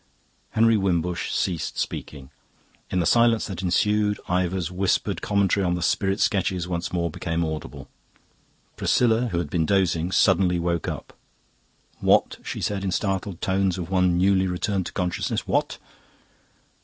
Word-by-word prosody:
Henry 115 0 +4
Wimbush 90 -3 -1
ceased 85 -4 -2
speaking. 70 -2 -5 0.6
In 90 - 0
the 85 - +1
silence 115 +3 +4
that 95 -2 -5
ensued 105 +3 +1
Ivor's 90 -1 -1
whispered 95 +1 0
commentary 100 -1 +1
on 90 -1 +1
the 90 - -3
spirit 95 +3 +1
sketches 95 -3 0
once 85 -1 -3
more 85 -2 -1
became 80 +2 -2
audible. 80 -1 -6 0.9
Priscilla, 120 0 +2
who 90 - -3
had 80 -4 -3
been 80 -3 0
dozing, 90 -3 +1
suddenly 90 0 +3
woke 85 -1 -1
up. - - -6 0.8
"What?" - - +2
she - - -5
said 100 -1 -1
in 95 - -1
the - - -2
startled 95 -2 -2
tones 95 -1 +1
of 90 0 -6
one 90 -2 +2
newly 95 +1 +3
returned 95 +1 -1
to - - -7
consciousness; 90 -1 -2
"what?" - - 0
90 Hz, 150 wpm, -24 LUFS, 85-100 Hz, 0.9 s, Henry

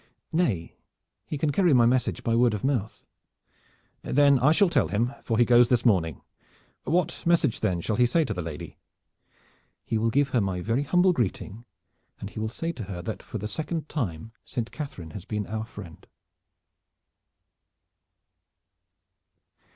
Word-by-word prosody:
"Nay, 115 - 0 0.5
he 150 - -3
can 145 +1 0
carry 175 0 +3
my 120 -2 +6
message 125 +1 +1
by 115 - +1
word 120 -2 +3
of 100 - -6
mouth." 125 -6 -1 1.0
"Then 140 -1 +4
I 140 +5 +4
shall 195 +5 +4
tell 135 - +2
him 115 +6 0
for 115 - -1
he 120 - +5
goes 120 0 +5
this 125 -1 +2
morning. 85 - +2 0.6
What 170 +2 0
message, 170 -8 +2
then, 90 -2 0
shall 105 +4 -2
he 125 0 +4
say 160 +6 +2
to 110 - -3
the 90 - -4
lady?" 80 -3 -8 1.1
"He 110 - -1
will 115 +1 +1
give 140 +4 +2
her 125 -3 +1
my 95 -2 -1
very 115 +8 0
humble 180 +6 +3
greeting, 115 - -3 0.5
and 100 - -7
he - - -7
will 110 0 -2
say 165 +8 -3
to 120 -10 -7
her 90 -3 -6
that 110 - -5
for - - -7
the 105 +1 -4
second 155 +6 -4
time 110 - -4
Saint 120 -3 -4
Catharine 95 - -7
has 95 - -8
been 105 -2 -3
our 110 +4 -4
friend." 85 -7 -12
120 Hz, 165 wpm, -26 LUFS, 105-145 Hz, 1.1 s, my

